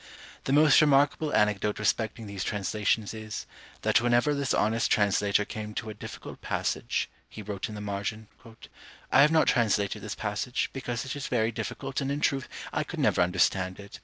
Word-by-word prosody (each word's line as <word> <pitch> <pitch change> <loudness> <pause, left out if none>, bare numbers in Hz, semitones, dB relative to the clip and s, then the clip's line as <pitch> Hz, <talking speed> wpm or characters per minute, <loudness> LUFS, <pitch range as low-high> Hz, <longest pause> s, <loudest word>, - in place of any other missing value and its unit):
The - - -1
most 150 +1 +6
remarkable 145 +1 +3
anecdote 105 0 +1
respecting 110 +1 -1
these 100 -3 -5
translations 105 +2 -1
is, 110 -1 -6 0.4
that - - +4
whenever 120 +5 +3
this 140 -2 -1
honest 110 +2 +2
translator 105 0 +2
came 105 0 -6
to 110 - -4
a - - -7
difficult 105 - -9
passage, - - -1 0.2
he 110 - -9
wrote 100 0 -4
in 105 - -7
the 105 - -6
margin, 105 +2 -4 0.8
"I - - +7
have 150 +2 +6
not 160 -1 +4
translated 105 -5 +2
this 110 - -5
passage, 105 +4 -2
because 120 -2 -4
it 135 - -4
is 145 - -4
very 115 -2 +1
difficult, 130 +4 -4
and 135 0 -1
in 145 - -1
truth 135 -2 0 0.2
I - - 0
could - - -7
never - - +3
understand 95 +1 +1
it." 100 0 -10
110 Hz, 180 wpm, -28 LUFS, 105-130 Hz, 0.8 s, I